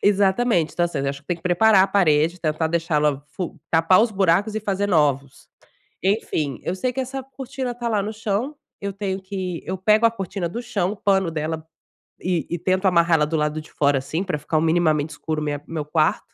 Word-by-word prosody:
Exatamente. 200 -3 +2
Então, 175 - +1
assim, 175 - -3
eu 140 0 -1
acho 140 0 -4
que - - -39
tem 175 - 0
que 165 - -21
preparar 190 +3 +5
a - - +3
parede, 170 -2 +2
tentar 155 0 0
deixá-la 150 -4 +1
fu 180 -2 -5
tapar 165 +4 +5
os 230 0 +2
buracos 195 +2 +2
e 220 - -1
fazer 200 -1 -1
novos. 140 -6 0 0.6
Enfim, 160 - 0
eu 180 - -2
sei 250 +7 -1
que 265 - -5
essa 265 +1 -4
cortina 265 -2 -5
tá 240 0 -4
lá 215 -3 +1
no 210 +2 -3
chão, 220 +6 -2 0.3
eu 200 - -2
tenho 195 -1 -3
que 185 -3 -5
eu 185 - -3
pego 215 +4 +4
a 230 - +5
cortina 195 -4 -4
do 235 +7 -5
chão, 200 -6 -1
o 210 - -7
pano 190 -4 +1
dela 155 0 -3 0.5
e 175 -4 -1
e 175 - -2
tento 185 +3 0
amarrar 170 -2 +4
ela 150 - +2
do 160 - -2
lado 150 +1 -1
de - - -17
fora, 140 -2 +2
assim, 155 +7 -3
pra 180 -6 -2
ficar 155 +2 -1
um - - +3
minimamente 160 -2 +2
escuro 155 +1 -4
minha 145 -1 -2
meu 155 -3 -4
quarto 155 +1 0
180 Hz, 220 wpm, -22 LUFS, 155-205 Hz, 0.6 s, preparar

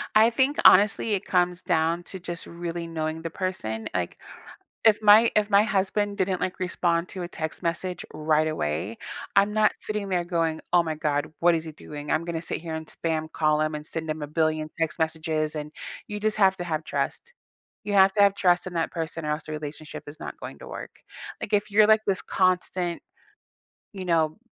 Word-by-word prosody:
I 220 +2 +7
think 265 +4 +1
honestly, 205 +3 +6
it 195 -1 -1
comes 180 -1 +1
down 165 +1 +1
to 190 - -8
just 175 -1 -6
really 170 0 -5
knowing 160 0 -3
the 165 - -4
person, 110 - -3
like, 90 -1 -2 0.7
if 220 -2 +6
my 215 +2 +7
if 210 -1 +3
my 200 0 +6
husband 205 0 0
didn't, 185 -1 0
like, 185 - -2
respond 175 -1 0
to 185 - -6
a 175 - -4
text 160 -2 -5
message 175 +1 -2
right 155 0 +1
away, 95 - -2 0.4
I'm 200 +1 +5
not 215 0 +3
sitting 210 -2 -3
there 180 -2 0
going, 165 -2 -1
"Oh 175 -1 +6
my 160 -2 -3
god 150 0 -1
what 175 0 +5
is 160 -1 -2
he 160 - -7
doing? 150 0 -8
I'm 160 +1 +1
gonna 165 -1 -3
sit - - -4
here 165 -1 -5
and 160 0 -5
spam 160 -1 -3
call 155 -1 +2
him 155 0 0
and 150 0 -6
send 160 -1 -4
him 155 0 -4
a - - -2
billion 155 0 0
text 165 -1 -1
messages, 160 -1 -1
and" 150 -1 -5 0.4
you 210 - -4
just 215 0 0
have 190 -2 +4
to 175 - -5
have 160 -2 -2
trust. 480 - -3 0.5
You 205 0 -2
have 195 0 +6
to 205 - +4
have 200 -1 +5
trust 180 -2 +2
in 185 - -6
that 165 - 0
person 165 -1 -4
or 150 - -1
else 150 0 -2
the 155 - -7
relationship 150 0 -7
is 150 +1 -10
not - - -7
going - - -8
to - - -10
work. - - -7 0.5
Like, 215 - -6
if 205 0 +1
you're, 210 +1 +6
like, 220 0 +5
this 195 -2 +1
constant, 180 -1 0 0.9
you 190 -2 -6
know, 160 -3 +1
170 Hz, 210 wpm, -26 LUFS, 155-195 Hz, 0.9 s, I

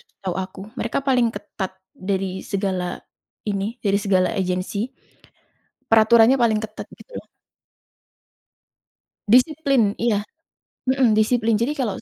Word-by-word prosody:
setahu 185 -2 -7
aku, 190 +1 -12 0.2
mereka 230 - -1
paling 250 -3 +3
ketat 200 -3 -6 0.2
dari 190 -1 -3
segala 190 -3 -2 0.5
ini, 205 +2 -2
dari 200 0 +3
segala 190 -3 +2
agency, 190 +3 -2 1.0
peraturannya 225 +3 +6
paling 225 -3 +3
ketat 215 0 -7
gitu - - -10
loh. - - -19 2.0
Disiplin, 275 -4 +4
iya, 215 -3 +1 0.7
mhm, 260 -4 +3
disiplin 225 +1 +2
jadi 235 +7 +1
kalau, 240 -8 -2
215 Hz, 110 wpm, -22 LUFS, 195-235 Hz, 2.0 s, peraturannya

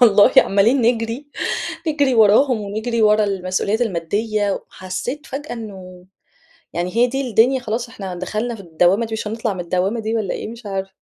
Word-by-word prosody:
والله، 210 -3 +6
عمّالين 220 +7 +5
نجري 230 +3 0 0.6
نجري 285 -4 +2
وراهم 225 +2 +5
ونجري 220 +3 -2
ورا 210 0 +4
المسؤوليات 195 +3 -1
الماديّة، 205 +2 -1
وحسّيت 195 +13 -6
فجأة 290 +3 -6
إنه، 190 -6 -9 0.7
يعني 175 +4 -3
هي 240 +1 +5
دي 270 +1 -3
الدنيا 250 +5 +4
خلاص، 235 +1 -3
إحنا 195 -5 -7
دخلنا 215 +6 -3
في 210 - -10
الدوامة 180 +5 +2
دي، 225 - -11
مش 220 - -4
هنطلع 225 -2 -2
من 180 - -5
الدوامة 185 +6 -1
دي 220 +1 -2
والّا 210 -4 -2
إيه؟! - - -5
مش 230 -1 -10
عارفة. 195 -1 -4
215 Hz, 170 wpm, -20 LUFS, 195-235 Hz, 0.7 s, والله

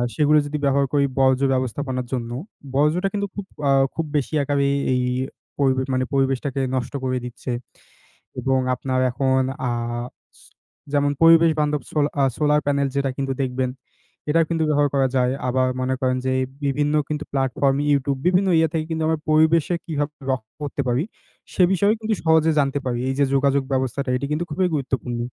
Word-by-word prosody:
সেগুলো 150 0 +4
যদি 150 +1 -3
ব্যবহার 140 0 +3
করি 140 -1 +3
বর্জ্য 130 0 +3
ব্যবস্থাপনার 130 0 -2
জন্য, 120 -2 -3 0.4
বর্জ্যটা 155 +7 +2
কিন্তু 200 0 -1
খুব 200 -2 -5 0.2
আ - - +5 0.2
খুব 165 - -1
বেশি 145 +2 -2
একাবে 140 0 0
এই 140 - +1 0.2
এই 125 - +1 0.6
পরিবেশ 130 -1 +2
মানে, 130 0 +1
পরিবেশটাকে 135 0 0
নষ্ট 125 +1 -3
করে 130 0 0
দিচ্ছে। 125 +1 -6 0.9
এবং 135 -1 +1 0.2
আপনার 130 0 -2
এখন 130 0 +1 0.3
আ - - 0 0.7
স - - -20 0.5
যেমন 145 0 +2
পরিবেশ 165 0 +7
বান্ধব 150 -2 0
সো - - -14 0.3
আ - - +4
সোলার 150 0 +2
প্যানেল 140 -1 +1
যেটা 140 -1 +1
কিন্তু 135 -1 -1
দেখবেন, 130 0 -1 0.6
এটাও 165 +1 +3
কিন্তু 165 -1 0
ব্যবহার 145 -1 +3
করা 135 -1 +3
যায়। 125 0 +2 0.2
আবার 130 0 +2
মনে 130 +1 0
করেন 130 0 +1
যে 130 - +1 0.3
বিভিন্ন 145 +2 0 0.2
কিন্তু 150 0 -2
প্লাটফর্ম, 135 +1 +1 0.2
YouTube, 140 -1 0
বিভিন্ন 185 +2 +3
ইয়ে 160 -1 +3
থেকে 155 -1 -1
কিন্তু 160 -1 -2
আমরা 160 -1 0
পরিবেশে 160 +2 +3
কিভাবে 150 -2 -2 0.2
রক্ষা 110 -4 -4
করতে 140 0 -2
পারি? 125 +5 +1 0.5
সে 185 - +3
বিষয়ে 200 +3 +3
কিন্তু 220 -1 0
সহজে 160 0 +4
জানতে 140 0 +1
পারি। 120 -1 -1
এই - - 0
যে - - +5
যোগাযোগ 140 0 +2
ব্যবস্থাটা, 130 +1 -1
এটি 140 - -4
কিন্তু 155 +3 -1
খুবই 185 +3 +1
গুরুত্বপূর্ণ। 125 -3 -2
140 Hz, 175 wpm, -22 LUFS, 130-150 Hz, 0.9 s, পরিবেশ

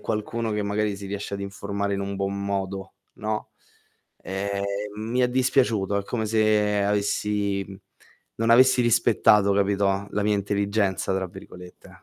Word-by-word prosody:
qualcuno 110 +2 -2
che, 105 0 -1
magari, 105 0 -1
si 100 0 -8
riesce 100 0 -5
ad 100 - -5
informare 100 0 -3
in 100 - -2
un 100 0 -3
buon 100 0 -2
modo, 95 -1 -3 0.2
no? 110 0 -4 0.7
Ehm, 100 +1 -3 0.4
mi 115 +4 -1
è 125 - +3
dispiaciuto, 125 -6 +1
è 100 - -4
come 110 -1 -2
se 105 -1 +2
avessi 100 -1 0
mhmm, 95 -1 -10 0.6
non 115 +1 +1
avessi 130 +1 +6
rispettato, 110 -3 +4
capito, 100 0 +1
la 105 - -1
mia 105 0 +2
"intelligenza", 100 -1 0
tra 95 0 -1
virgolette, 90 0 -13
100 Hz, 150 wpm, -25 LUFS, 100-110 Hz, 0.7 s, avessi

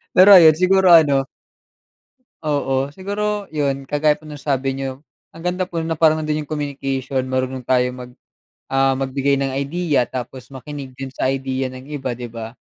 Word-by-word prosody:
Pero 190 +3 +8
ayun, 160 -4 +8
siguro 185 +1 +4
ano 145 -5 +5 1.2
Oo, 140 -1 -1
siguro 205 +2 -3
yun, 140 -3 -1
kagaya 150 +1 +3
po 150 - -15
ng 150 - -8
sabi 135 -1 -2
niyo, 135 0 -5 0.3
ang 165 - -12
ganda 180 +2 -1
po 170 -2 -4
na 160 -1 -3
parang 155 -1 +3
nando'n 155 -1 -2
yung - - -35
communication, 135 -3 -3
marunong 130 -1 -3
tayo 125 0 +2
mag, 125 0 -10 0.5
ah, 135 0 +2
magbigay 135 +1 0
ng 135 -1 -2
idea, 145 0 0
tapos 125 +1 -7
makinig 135 0 -8
din 135 +1 -7
sa 130 - 0
idea 130 -1 -3
ng 130 +2 -11
iba, 135 -4 -4
'di 120 0 -6
ba. 115 -1 -8
140 Hz, 170 wpm, -20 LUFS, 130-155 Hz, 1.2 s, Pero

